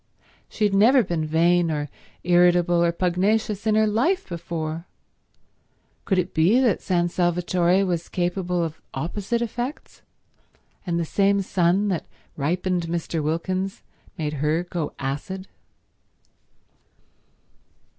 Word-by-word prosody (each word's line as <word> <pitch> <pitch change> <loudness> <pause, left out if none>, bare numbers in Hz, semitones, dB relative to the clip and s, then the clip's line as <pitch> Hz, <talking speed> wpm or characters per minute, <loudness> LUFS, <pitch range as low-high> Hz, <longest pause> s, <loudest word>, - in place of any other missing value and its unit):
She 220 - -3
had 205 -1 +3
never 235 +6 +5
been 165 -4 -2
vain 170 +2 +3
or 150 -2 -2 0.4
irritable 175 0 +4
or 170 - +3
pugnacious 200 +5 0
in 215 - +3
her 220 0 +4
life 245 - +1
before. 165 -1 -5 1.2
Could 190 - +1
it 180 - -1
be 175 +10 +4
that 245 -7 +2
San 175 -2 +1
Salvatore 175 +1 +1
was 175 -2 -2
capable 180 0 -1
of 160 -1 -5
opposite 200 - -2
effects, 240 +5 -5 0.9
and 170 -1 0
the 170 - -1
same 200 +3 +2
sun 185 +2 +1
that 180 -4 -2 0.3
ripened 175 +3 -1
Mr. 165 -1 -2
Wilkins 185 +5 -2 0.3
made 150 -3 -2
her 155 +3 +1
go 175 -4 -4
acid? 145 +8 -4
175 Hz, 120 wpm, -24 LUFS, 170-195 Hz, 1.2 s, never